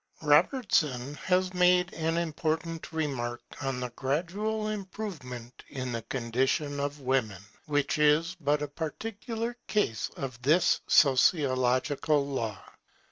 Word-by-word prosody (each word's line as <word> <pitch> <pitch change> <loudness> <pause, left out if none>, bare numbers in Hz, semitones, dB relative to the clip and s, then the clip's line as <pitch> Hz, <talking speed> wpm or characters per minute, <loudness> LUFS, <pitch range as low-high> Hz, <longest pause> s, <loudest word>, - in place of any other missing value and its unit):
Robertson 150 - +2
has 180 +5 0
made 180 0 +4
an 165 0 -1
important 165 0 -2
remark 130 -7 -2 0.2
on 135 -2 -2
the 125 -1 -4
gradual 185 - -2
improvement 180 - -6
in 130 -3 -4
the 115 -1 -3
condition 135 +5 -1
of 145 +1 -3
women, 120 -8 0 0.2
which 145 0 0
is 150 +4 +3
but 150 0 +1
a - - -2
particular 225 - -4
case 205 - 0
of 130 -3 -5
this 160 +7 +3
sociological 135 +1 +3
law. 115 -7 -3
145 Hz, 115 wpm, -29 LUFS, 130-175 Hz, 0.2 s, made